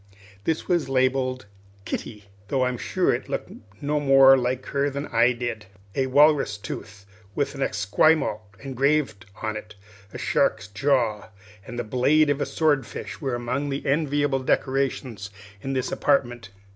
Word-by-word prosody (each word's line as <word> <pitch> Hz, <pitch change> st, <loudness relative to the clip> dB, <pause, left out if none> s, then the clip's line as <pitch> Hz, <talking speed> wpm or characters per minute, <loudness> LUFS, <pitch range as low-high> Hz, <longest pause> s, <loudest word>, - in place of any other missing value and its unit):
This 160 Hz, -1 st, -1 dB
was 175 Hz, -6 st, +1 dB
labelled 130 Hz, -2 st, +1 dB, 0.4 s
"Kitty," 105 Hz, -3 st, -5 dB, 0.2 s
though 130 Hz, +3 st, +1 dB
I'm 125 Hz, -1 st, -2 dB
sure -, -, +1 dB
it -, -, -4 dB
looked -, -, -4 dB, 0.3 s
no 150 Hz, +1 st, +1 dB
more 135 Hz, -1 st, +7 dB
like 130 Hz, 0 st, -1 dB
her 140 Hz, +1 st, 0 dB
than 140 Hz, +1 st, -4 dB
I 115 Hz, 0 st, +3 dB
did. 120 Hz, -4 st, -4 dB, 0.3 s
A 130 Hz, +3 st, 0 dB
walrus 145 Hz, -5 st, +4 dB
tooth 100 Hz, 0 st, -8 dB, 0.3 s
with 140 Hz, -1 st, -1 dB
an 140 Hz, -, -7 dB
Esquimaux 105 Hz, +4 st, +2 dB, 0.2 s
engraved 135 Hz, -6 st, 0 dB, 0.2 s
on 110 Hz, -1 st, -2 dB
it, 105 Hz, -1 st, -8 dB, 0.4 s
a -, -, -7 dB
shark's -, -, +1 dB
jaw, 110 Hz, 0 st, 0 dB, 0.4 s
and 120 Hz, -, -7 dB
the -, -, -1 dB
blade 145 Hz, +7 st, +3 dB
of 145 Hz, 0 st, -1 dB
a -, -, 0 dB
sword 150 Hz, -4 st, +1 dB
fish -, -, -8 dB
were 135 Hz, -4 st, -1 dB
among 125 Hz, +4 st, -2 dB
the 140 Hz, 0 st, -4 dB
enviable 145 Hz, -1 st, +1 dB
decorations 130 Hz, -6 st, -1 dB, 0.3 s
of 135 Hz, 0 st, -3 dB
this 130 Hz, -, -1 dB
apartment. 120 Hz, -6 st, 0 dB
130 Hz, 155 wpm, -24 LUFS, 120-140 Hz, 0.4 s, more